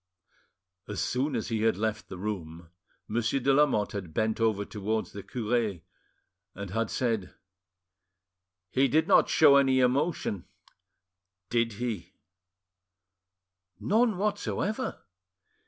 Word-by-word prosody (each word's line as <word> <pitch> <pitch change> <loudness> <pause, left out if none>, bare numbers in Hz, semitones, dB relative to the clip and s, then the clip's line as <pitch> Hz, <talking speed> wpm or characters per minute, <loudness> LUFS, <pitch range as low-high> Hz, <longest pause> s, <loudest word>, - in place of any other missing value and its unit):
As 105 -2 -4
soon 135 +2 -1
as 115 - -2
he 110 -2 -1
had 110 -4 +2
left 110 0 -2
the 95 - -7
room, 85 -5 -6 0.4
Monsieur 120 +4 0
de 135 +2 +2
Lamotte 135 -8 +3
had 90 -6 -6
bent 110 +1 0
over 105 -3 +1
towards 105 -2 -3
the 100 - -7
cure, 110 -5 -1 0.7
and 100 0 -6
had 115 +1 -1
said— 115 -7 -2 1.4
"He 135 +1 +3
did 160 +3 +2
not - - +5
show 145 -3 +6
any 135 -1 +4
emotion, 130 - 0 1.1
did—he?" 115 -5 -2 1.7
"None 220 -1 +2
whatever." 210 +4 -2
115 Hz, 110 wpm, -28 LUFS, 100-135 Hz, 1.7 s, show